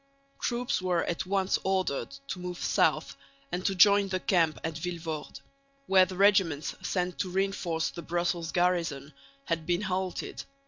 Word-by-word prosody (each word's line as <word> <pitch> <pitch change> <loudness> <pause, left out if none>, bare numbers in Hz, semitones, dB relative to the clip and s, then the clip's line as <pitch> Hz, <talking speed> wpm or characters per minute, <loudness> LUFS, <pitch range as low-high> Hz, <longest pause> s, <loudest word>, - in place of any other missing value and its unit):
Troops 240 -4 -1
were 180 -2 +1
at 175 +2 -3
once 190 -1 +1
ordered 190 -7 0 0.2
to 185 - -4
move 180 -1 -5
south - - +1 0.4
and 180 +1 -2
to 195 - 0
join 200 +1 +6
the 185 -1 -1
camp 170 -4 +2
at 160 - -2
Vilvoorde, 165 -3 -5 0.4
where 190 -4 +6
the 185 - -7
regiments 190 -7 +3
sent 180 -1 -2
to 185 - -1
reinforce 185 -3 -1
the 170 - -7
Brussels 170 0 -1
garrison 170 -6 0 0.3
had 165 -2 -2
been 175 +1 +1
halted. 190 -1 -3
180 Hz, 150 wpm, -29 LUFS, 165-190 Hz, 0.4 s, join